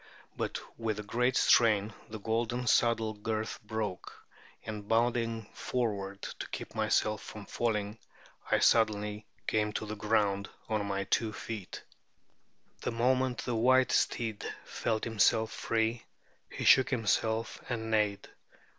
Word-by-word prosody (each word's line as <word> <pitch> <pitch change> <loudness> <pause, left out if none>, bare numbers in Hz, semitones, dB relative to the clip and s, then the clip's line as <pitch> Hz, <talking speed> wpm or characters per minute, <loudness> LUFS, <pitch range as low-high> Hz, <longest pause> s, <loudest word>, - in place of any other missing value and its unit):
But - - -2 0.2
with 110 -2 -1
the 105 - -4
great 125 +4 +1
strain 110 -2 +4 0.2
the 110 - -5
golden 115 +3 -1
saddle 115 -2 +3
girth 110 +1 -3
broke, 105 -3 -4 0.5
and 105 -2 -6
bounding 115 -1 +1
forward 100 -5 -2 0.2
to - - -5
keep - - -6
myself 105 0 +1
from 105 -2 -9
falling, 105 -2 -1 0.5
I - - +4
suddenly 105 -2 +2 0.2
came 105 -1 +1
to 110 - -3
the 110 0 -5
ground 100 -2 +1 0.2
on 105 -2 -1
my 100 0 -1
two 110 +3 0
feet. 105 -3 -6 1.0
The - - -1
moment 125 +1 +1
the 125 - -1
white 130 +3 +4
steed 110 -3 0 0.2
felt 110 -2 -2
himself 110 0 +3
free, 115 +1 -1 0.5
he - - -5
shook 130 - +6
himself 110 -2 0
and 110 -2 -3
neighed. 105 -2 +1
110 Hz, 130 wpm, -31 LUFS, 105-115 Hz, 1.0 s, shook